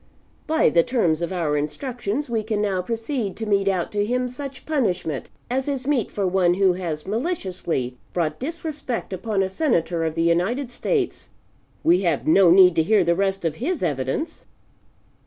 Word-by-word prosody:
By 320 +1 +3
the 170 - +5
terms 170 -7 +1
of 170 - -2
our 165 -5 0
instructions 240 - -3
we 230 -2 -1
can 215 -1 -2
now 195 -3 0
proceed 225 +1 -3
to 225 - -4
mete 200 -2 +1
out 185 -3 0
to 205 -1 0
him 250 +3 0
such 270 +1 -8
punishment 185 - -1 0.2
as 260 +2 -1
is 270 -3 -2
meet 275 -6 +1
for 200 - -2
one 180 -1 +3
who 190 -1 +4
has 165 -4 -4
maliciously 190 - -2
brought 165 -3 -1
disrespect 295 - -4
upon 195 +1 -1
a - - 0
Senator 185 - 0
of 160 -1 -2
the 165 - +1
United 200 +11 +1
States. 400 - -2 0.5
We 175 +3 +4
have 170 -6 0
no 180 +3 +6
need 180 0 +7
to - - +6
hear 205 +4 +3
the 170 0 +3
rest 195 0 -1
of 160 -2 -1
his 320 +6 -2
evidence." 135 - -2
195 Hz, 175 wpm, -23 LUFS, 170-250 Hz, 0.5 s, need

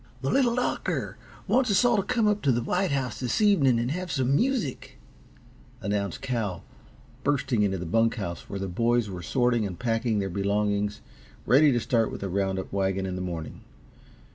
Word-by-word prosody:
"The 135 - -1
Little 245 -4 +3
Doctor 250 - -2 0.3
wants 255 -1 +2
us 200 +3 +4
all 240 -1 +4
to - - +3
come 230 +2 0
up 210 0 +1
t' 140 - +1
the 120 -2 +2
White 185 +8 0
House 135 -3 -2
this 125 -2 -1
evening 160 - +4
and 120 +3 -1
have 180 +1 -3
some 135 -1 +1
music," 230 - -1 0.8
announced 100 0 -2
Cal, 115 -9 -2 0.6
bursting 135 -5 +1
into 95 -2 +1
the 90 - -5
bunk 115 +7 +2
house 85 -7 -6
where 100 - -4
the 95 - -3
boys 115 +3 +1
were 90 -1 -6
sorting 120 +3 +1
and 95 -4 -4
packing 115 -2 0
their 100 -1 -1
belongings 100 +2 -1 0.4
ready 145 +3 +5
to 120 - +2
start 115 -2 +1
with - - -7
the 100 - -3
round 95 0 0
up 95 - -6
wagon 95 -1 0
in 95 -1 -3
the 90 - -4
morning. 85 -3 -5
115 Hz, 190 wpm, -26 LUFS, 100-140 Hz, 0.8 s, ready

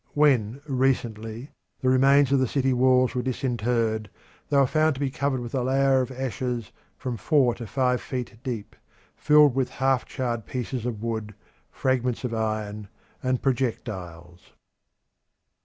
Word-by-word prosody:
When 135 -4 +3
recently 125 -2 -1 0.3
the 130 - 0
remains 135 +1 +5
of 140 - +4
the 130 - +2
city 135 +1 +1
walls 130 0 +3
were 125 - -1
disinterred 120 -4 -1 0.4
they 145 - +2
were 140 - +6
found 155 +2 +2
to - - -8
be 140 -2 -1
covered 140 -2 -1
with 120 -1 -7
a 130 - 0
layer 135 +1 +3
of 125 - -3
ashes 125 -3 -3 0.3
from 125 -3 -4
four 135 -2 +3
to 115 - -8
five 125 +2 +1
feet 125 -3 -5
deep. 115 -5 -5 0.4
Filled 150 -2 +5
with 130 -1 0
half 135 -1 +1
charred 120 -5 -3
pieces 125 -1 -3
of 110 -3 -4
wood, 110 -3 -3 0.3
fragments 125 -2 -1
of 125 -2 -2
iron, 110 -2 -3 0.3
and 130 -1 -1
projectiles. 95 - -3
125 Hz, 150 wpm, -25 LUFS, 115-135 Hz, 0.4 s, were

